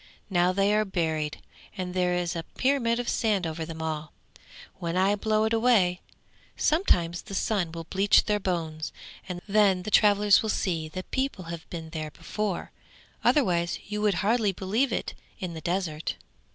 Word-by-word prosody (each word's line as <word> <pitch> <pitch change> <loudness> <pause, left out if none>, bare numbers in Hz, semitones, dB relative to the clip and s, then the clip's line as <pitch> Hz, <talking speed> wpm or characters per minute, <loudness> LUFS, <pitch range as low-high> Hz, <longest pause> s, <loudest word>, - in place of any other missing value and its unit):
Now 180 0 +3
they 195 +2 +2
are 215 0 +3
buried, 160 -6 -2 0.3
and 180 -1 -3
there 180 -1 +1
is 175 -1 -1
a 165 - -2
pyramid 240 +4 0
of 245 - -3
sand 210 -5 +1
over 160 0 -3
them 160 0 -6
all; 155 -1 -4 0.7
when 170 -1 -2
I 195 +2 +3
blow 215 +1 +1
it 220 +1 +1
away, 220 -6 +3 0.6
sometime 180 - +2
the 195 - -6
sun 190 -4 0
will 165 0 -6
bleach 195 +4 +4
their 210 -1 0
bones, 165 -5 -3 0.4
and 175 -1 -4
then 200 -3 +3
travellers 205 0 +5
will 220 - -3
see 165 -6 -1
that 185 +3 -7
people 265 -9 -2
have 165 -1 -9
been 160 -2 -7
there 155 -2 -4
before, 205 +5 -4 0.5
otherwise 175 - +2
you 210 +1 -3
would 210 -3 +2
hardly 220 -2 +3
believe 210 +8 0
it - - -2 0.2
in 180 -2 -5
the 160 - -7
desert!' 170 -3 -2
185 Hz, 165 wpm, -27 LUFS, 170-210 Hz, 0.7 s, travellers